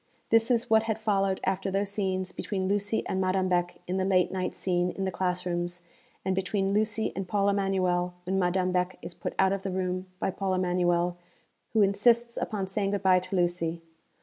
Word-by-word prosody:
This 225 +1 +4
is 240 -1 +2
what 220 -1 +5
had 220 - +1
followed 195 -3 +1
after 190 +1 0
those 195 +1 -1
scenes 190 -2 -1
between 190 0 -3
Lucy 205 +2 0
and 190 - -1
Madame 185 0 +1
Beck 175 -1 0
in 180 +1 -1
the 190 - +1
late 185 -1 +3
night 185 -1 -2
scene 180 -1 0
in 195 +1 -3
the 190 - -1
class 180 -1 -1
rooms 175 0 -2 0.4
and 190 - +1
between 195 +1 0
Lucy 215 +1 0
and 190 -1 -3
Paul 200 +1 +2
Emanuel, 185 -3 +1
when 190 +2 0
Madame 185 0 +1
Beck 180 0 0
is - - -6
put - - -5
out 190 0 +4
of 195 - -2
the 195 - -3
room 185 0 -2
by - - 0
Paul 190 0 -1
Emanuel, 175 -1 +1 0.6
who 220 -2 +5
insists 235 +4 +3
upon 205 -3 -2
saying 195 +1 -1
good 200 0 -2
bye 185 -1 +5
to 185 +2 -5
Lucy. 175 -2 0
190 Hz, 205 wpm, -28 LUFS, 180-200 Hz, 0.6 s, what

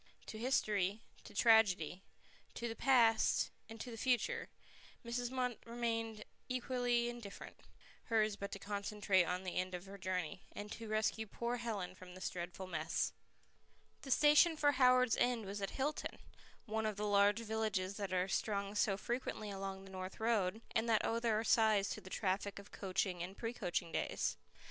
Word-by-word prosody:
To 215 - -7
history, 210 -5 +1 0.3
to - - -12
tragedy, 200 -7 +4 0.5
to 235 - -3
the 225 - -4
past, 235 -4 +4 0.2
to 225 +2 -7
the 225 - -7
future, 370 - +1 0.6
Mrs. 240 +1 -2
Munt 250 -2 -1
remained 230 -2 -2 0.2
equally 245 -1 +1
indifferent; 240 -4 -8 0.5
hers 215 -3 +2
but 200 0 -6
to - - -4
concentrate 200 -2 +1
on 180 +2 -2
the 185 - -4
end 185 0 -1
of 180 +1 -7
her 195 +1 -10
journey, 185 0 -2
and 205 0 -6
to 230 - -6
rescue 215 +1 0
poor 235 +4 -2
Helen 220 -7 -3
from 185 -1 -12
this 185 - -3
dreadful 175 +1 -5
mess. 165 -2 -1 0.9
The 275 - -9
station 300 +4 +6
for 290 -1 +4
Howards 255 -3 +5
End 245 -3 +1
was 200 +1 -5
at 195 - -1
Hilton, 290 +3 -2 0.5
one 220 -1 -1
of 215 - -2
the 210 +1 -2
large 205 +1 +4
villages 215 -4 -1
that 200 -3 -3
are 185 0 +1
strung 200 0 -1
so 205 -1 +2
frequently 220 -2 -3
along 195 0 -5
the 195 - -12
North 185 0 -6
Road, 220 -2 +1
and 230 +1 +1
that 220 -2 +3
owe 230 - +1
their 225 -2 +1
size 215 -3 +4
to - - -4
the 185 - -11
traffic 195 +1 -1
of 200 0 -10
coaching 185 -2 -1
and 185 +3 -6
pre 230 0 -3
coaching 180 -7 -2
days. - - -1
215 Hz, 170 wpm, -37 LUFS, 195-235 Hz, 0.9 s, station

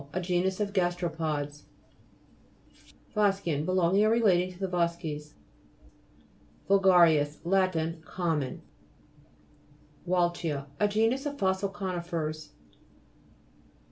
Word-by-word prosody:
A 185 - -1
genus 180 +1 0
of 205 -1 -2
gasteropods. 165 -5 -2 1.5
VO'SGEAN 195 -8 +1
Belonging 185 +2 +2
or 215 - +4
relating 185 -6 +2
to 170 -5 -2 1.4
VULGA'RIS 170 -7 +4
Lat. 170 -3 0
Common. 160 -6 -2 1.4
WAL'CHIA 175 -5 0
A 210 - +3
genus 225 +7 +1
of 285 0 -5
fossil 190 -1 0
co'nifers 170 -6 -4
(p. - - -28
175 Hz, 80 wpm, -28 LUFS, 160-195 Hz, 1.5 s, or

